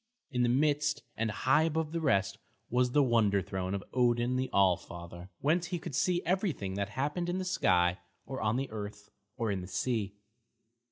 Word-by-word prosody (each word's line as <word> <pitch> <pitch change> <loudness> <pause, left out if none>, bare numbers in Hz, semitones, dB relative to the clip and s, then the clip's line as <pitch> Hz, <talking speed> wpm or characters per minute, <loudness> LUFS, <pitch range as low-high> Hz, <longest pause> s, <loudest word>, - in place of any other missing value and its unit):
In 125 - 0
the 120 - +3
midst, 150 +3 +1
and 115 0 -1
high 135 +8 +3
above 160 -1 0
the 165 0 -2
rest, 100 -8 +1 0.3
was 125 +1 +3
the 145 - +5
wonder 110 -5 +3
throne 95 0 -3
of 100 - -4
Odin 120 0 +2
the 130 0 -1
All 95 -2 +5
Father, 85 +1 -10
whence 165 +4 +2
he 175 - -2
could 170 -2 -7
see 175 +7 +1
everything 175 - -1
that 100 0 -2
happened 150 - -2
in 180 - -1
the 185 - -2
sky 90 - +2 0.3
or 130 - -5
on 105 +1 +1
the 135 -1 -2
earth 105 -1 -7 0.3
or 115 -3 0
in 95 -2 -2
the 90 - -7
sea. 105 -1 -1
120 Hz, 190 wpm, -31 LUFS, 100-150 Hz, 0.3 s, the